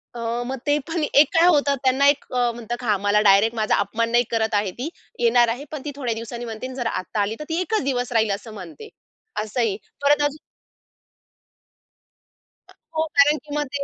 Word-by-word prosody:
अ, - - -6 0.3
मग 265 +1 -3
ते 290 - +3
पण 325 -1 -2
एक 290 0 +5
काय 330 +1 +5
होतं 290 -4 +3
त्यांना 265 +2 +3
एक 285 - +1
अ, 245 -1 +2
म्हणतात, 240 +1 -6
"हां, 210 -4 +2
मला 205 +1 +3
डायरेक्ट 210 +3 +4
माझा 215 -1 +1
अपमान 225 +3 -1
नाही 240 +1 +4
करत 220 -1 0
आहे 205 -2 0
ती, 295 +6 -3 0.3
येणार 240 0 +4
आहे, 250 +6 -4
पण 300 -3 -5
ती 295 - -3
थोड्या 250 -5 -2
दिवसांनी 235 +1 -6
म्हणते 225 +2 -6
आणि 260 - -9
जर 245 -3 -2
आत्ता 195 +2 -3
आली 205 +2 -1
तर 300 - -5
ती 330 +2 -1
एकच 435 +1 -1
दिवस 250 -3 -1
राहील 220 -2 +2
असं 215 +2 -11
म्हणते." 330 - -10 0.5
असंही. 220 -2 -1 0.2
परत 290 +1 +3
अजून 290 +1 -1 2.6
हो 315 - +2
कारण 295 +2 +6
की 295 -1 -7
मग 295 - 0
ते 280 - -1
245 Hz, 200 wpm, -22 LUFS, 225-290 Hz, 2.6 s, कारण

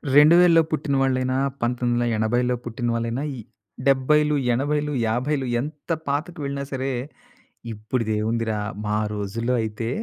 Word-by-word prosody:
2000లో 165 +3 +7
పుట్టిన 150 -2 0
వాళ్ళయినా, 130 -1 +1 0.2
1980లో 120 0 +1
పుట్టిన 120 +1 -3
వాళ్ళయినా, 115 +3 -2 0.6
70లు 150 +3 +3 0.2
80లు 145 +4 0
50లు 130 +5 0 0.2
ఎంత 150 +3 -7 0.2
పాతకు 155 +5 -2
వెళ్ళినా 140 0 -3
సరే, 135 0 -2 0.8
ఇప్పుడిది 110 +1 -2
ఏముందిరా! 110 0 -1 0.3
మా 105 - 0 0.2
రోజుల్లో 110 +4 -2
అయితే 110 +1 -3
130 Hz, 110 wpm, -23 LUFS, 115-145 Hz, 0.8 s, 2000లో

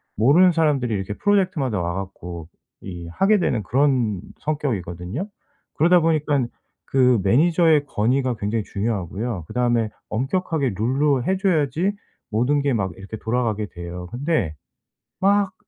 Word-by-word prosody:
모르는 155 - +5
사람들이 150 -7 +1
이렇게 95 +1 -3
프로젝트마다 180 - +1
와 85 0 -2
갖고 90 -3 -7 0.3
이 85 -3 -7
하게 195 - +3
되는 120 -10 0
그런 125 -4 +1 0.2
성격이거든요. 120 - -3 0.5
그러다 175 +3 +5
보니깐 150 -5 +1 0.4
그 125 -4 +3
매니저의 160 - +4
권위가 125 +2 0
굉장히 105 +1 -1
중요하고요. 100 -1 -3
그다음에 120 -3 +1 0.2
엄격하게 140 - -1
룰로 135 +2 +2
해 190 +4 +1
줘야지 170 -1 +1 0.4
모든 130 +7 +2
게 140 -2 +1
막 95 -5 -1
이렇게 100 +3 -8
돌아가게 110 -3 -1
돼요. 90 0 -8
근데 120 - -1 0.6
막 200 0 +2
125 Hz, 320 characters per minute, -22 LUFS, 105-155 Hz, 0.6 s, 모르는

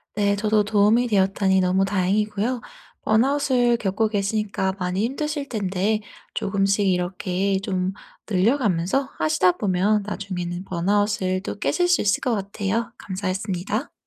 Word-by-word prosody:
네 200 -1 +2
저도 215 +1 +2
도움이 215 +3 +3
되었다니 195 -2 +2
너무 185 +1 +2
다행이고요 210 +5 0 0.4
번아웃을 250 +1 +2
겪고 215 +1 0
계시니까 200 -2 -1
많이 180 +1 -1
힘드실 290 +2 -3
텐데 205 0 -1 0.3
쪼금씩 195 0 +1
이렇게 185 +1 0
좀 185 -1 -1 0.3
늘려 220 +8 +2
가면서 210 +6 0
하시다 165 +3 +3
보면 200 +2 +1
나중에는 185 -3 -4
번아웃을 185 +1 0
또 205 - -5
깨실 355 - +1
수 350 - +3
있을 200 -1 +1
것 250 - 0
같아요. 200 +3 -2
감사했습니다. 190 +3 -3
200 Hz, 320 characters per minute, -23 LUFS, 190-220 Hz, 0.4 s, 도움이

